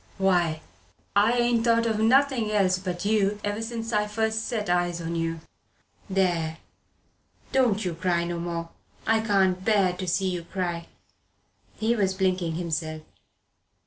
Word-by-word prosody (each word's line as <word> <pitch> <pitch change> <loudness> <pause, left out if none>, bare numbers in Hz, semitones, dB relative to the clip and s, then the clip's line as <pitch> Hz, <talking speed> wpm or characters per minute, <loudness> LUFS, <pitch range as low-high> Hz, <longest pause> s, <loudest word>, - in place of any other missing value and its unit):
Why, 175 -5 +2 0.5
I 210 +3 +5
ain't 240 -1 +2
thought 230 -1 +3
o' 225 - +1
nothing 240 0 +3
else 185 -3 +2
but 180 0 -4
you 210 -1 +2
ever 205 +1 -2
since 225 0 -4
I 210 0 +2
first 220 +1 -1
set 215 -3 -2
eyes 175 -1 +1
on 170 0 -4
you. 165 -1 -2 0.7
There 175 -4 0 0.9
don't 230 -6 +2
you 180 - -1
cry 170 +1 0
no 170 0 -3
more. 170 -1 -4 0.4
I 225 0 +3
can't 195 -4 +2
abear 195 -2 +2
to 185 +1 -5
see 185 +2 +1
you 175 -1 -3
cry." 175 -2 -3 0.9
He 225 +2 +1
was 195 -3 +1
blinking 185 -3 0
himself. 160 -2 -3
190 Hz, 145 wpm, -26 LUFS, 175-220 Hz, 0.9 s, I